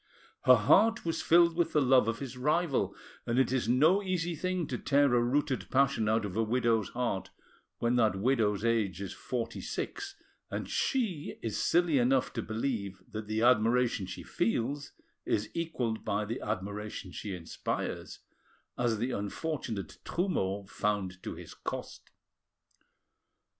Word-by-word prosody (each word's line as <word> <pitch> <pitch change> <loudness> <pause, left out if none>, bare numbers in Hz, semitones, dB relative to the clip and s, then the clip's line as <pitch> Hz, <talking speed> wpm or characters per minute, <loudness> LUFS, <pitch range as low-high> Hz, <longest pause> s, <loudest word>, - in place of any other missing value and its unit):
Her 130 - +9
heart 195 - +4
was 165 - -1
filled 170 0 +5
with 170 -1 +1
the 150 - +4
love 130 -4 +5
of 115 0 0
his 135 -2 -6
rival, 150 +3 +1 0.3
and 115 - 0
it 130 -2 +3
is 130 -3 0
no 155 +11 +5
easy 175 -3 -1
thing 185 +1 -1
to 125 -4 -4
tear 140 -2 +3
a 120 - +4
rooted 130 -3 0
passion 135 -5 +2
out 110 0 +2
of 95 -2 -5
a 115 - +2
widow's 115 -1 +1
heart 120 -6 -2 0.5
when 120 +1 +1
that 110 -5 +3
widow's 105 -1 +1
age 110 -6 +1
is 100 -1 -5
forty 120 -3 -4
six, 400 -1 -4 0.3
and - - -4
she 215 - -1
is 115 -3 -1
silly 170 -5 +3
enough 130 +1 +2
to 115 - -2
believe 110 -4 -3
that 110 -1 -5
the 110 +1 0
admiration 120 -3 +3
she 90 - -7
feels 125 +5 -1 0.3
is 105 - -1
equalled 130 -10 -2
by 105 +1 -1
the 115 +4 -4
admiration 105 -1 -4
she 100 +1 -5
inspires, 85 -2 -4 0.6
as 120 -2 +1
the 120 +4 -1
unfortunate 110 - -4
Trumeau 100 - -1
found 95 -2 -2
to - - -5
his - - -10
cost. - - -6
120 Hz, 155 wpm, -31 LUFS, 105-145 Hz, 0.6 s, Her